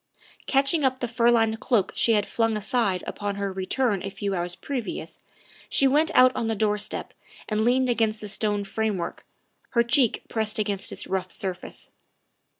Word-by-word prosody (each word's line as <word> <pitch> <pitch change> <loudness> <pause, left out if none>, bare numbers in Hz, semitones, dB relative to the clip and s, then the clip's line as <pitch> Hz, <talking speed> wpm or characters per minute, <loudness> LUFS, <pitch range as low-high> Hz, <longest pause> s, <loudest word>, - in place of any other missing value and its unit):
Catching 275 +3 +2
up 260 -1 +2
the 245 - -3
fur 235 0 +2
lined 225 -2 +2
cloak 220 -7 +1
she 230 - +3
had 210 -2 +2
flung 225 -2 0
aside 210 -4 0
upon 205 -1 -4
her 200 -1 -3
return 195 +2 -1
a 195 - -4
few 200 0 -3
hours 175 -1 -2
previous 260 -5 -5 0.5
she 275 - +4
went 300 +4 +3
out 255 0 +6
on 230 - -1
the 225 - 0
doorstep 210 0 0 0.3
and 215 0 0
leaned 255 +2 +3
against 225 -3 +1
the 210 - -7
stone 205 0 -1
framework, 200 -3 -3 0.5
her 235 - +4
cheek 240 0 +2
pressed 220 -2 0
against 205 -2 -2
its - - -4
rough 185 -1 -3
surface. 185 -2 -5
220 Hz, 170 wpm, -25 LUFS, 200-245 Hz, 0.5 s, out